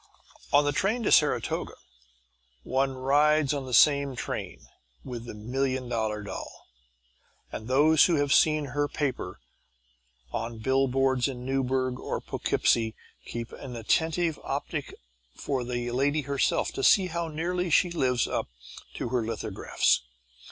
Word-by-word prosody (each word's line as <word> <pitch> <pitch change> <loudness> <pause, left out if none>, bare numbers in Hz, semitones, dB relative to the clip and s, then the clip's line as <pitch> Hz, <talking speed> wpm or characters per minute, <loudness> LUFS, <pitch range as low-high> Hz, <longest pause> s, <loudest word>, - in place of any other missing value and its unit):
On 145 +1 +5
the 145 - +2
train 210 - 0
to - - +1
Saratoga - - +2 0.9
one 135 +1 0
rides 145 +2 +3
on 140 -2 -4
the - - -7
same 140 +3 +4
train - - -5 0.4
with 120 -2 -7
the 120 - -8
Million 130 +3 -2
Dollar 110 -3 -2
Doll, 100 -2 -8 0.9
and 110 - -7
those 150 +5 +5
who 175 - +2
have 145 -1 +2
seen 155 -3 +3
her 145 0 +1
"paper" 135 -12 -3 0.9
on 115 +1 -3
the - - -10
billboards 130 +1 +1
in 125 -2 -6
Newburgh 130 -1 -1
or - - -3
Poughkeepsie 110 -1 0 0.3
keep 120 0 -5
an 130 -3 -8
attentive 160 +7 0
optic - - -3
open - - -12 0.4
for 135 -3 -2
the 120 0 -3
lady 140 +5 +1
herself 140 0 0
to 135 - -5
see 190 +6 +6
how 170 -1 -3
nearly 175 +3 -2
she 175 +2 +3
lives 125 -7 +1
up - - -2 0.5
to - - -3
her 125 -1 0
lithographs. 110 -2 0
135 Hz, 145 wpm, -27 LUFS, 120-150 Hz, 0.9 s, see